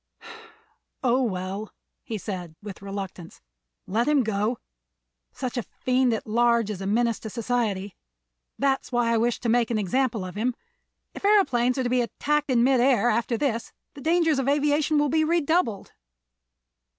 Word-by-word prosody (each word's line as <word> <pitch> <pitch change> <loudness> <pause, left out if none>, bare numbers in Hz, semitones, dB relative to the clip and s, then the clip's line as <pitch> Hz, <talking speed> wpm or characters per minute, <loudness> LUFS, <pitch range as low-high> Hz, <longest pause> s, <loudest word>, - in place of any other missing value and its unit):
"Oh, 255 +1 +3
well," 195 -1 -3 0.3
he 220 - -5
said, 180 -5 -6
with 205 -2 -9
reluctance, 195 -3 -7 0.5
"let 225 +7 0
him 295 -3 +3
go. 215 +2 -1 0.7
Such 255 -1 -5
a - - +1
fiend, 255 +2 0
at 225 - -2
large, 235 0 +2
is 195 -2 -6
a 195 - -3
menace 230 +2 +1
to 220 - -7
society. 215 -4 -2 0.6
That 270 -1 +1
is - - -15
why 240 -1 +2
I - - +3
wished 235 +2 0
to - - 0
make 235 0 +2
an 230 - 0
example 220 0 0
of 180 - -7
him. 235 +4 -1 0.6
If - - -9
aëroplanes 260 - +3
are 260 - 0
to - - 0
be 250 0 +2
attacked 295 +5 -1
in 240 -2 +3
mid 260 0 +4
air, 240 -3 +4
after 235 +1 0
this, 235 -3 -2 0.2
the 280 - -11
dangers 325 -1 +2
of 270 0 0
aviation 295 +1 +2
will 295 0 +2
be 315 +2 +2
redoubled." 315 - 0
240 Hz, 170 wpm, -25 LUFS, 215-270 Hz, 0.7 s, mid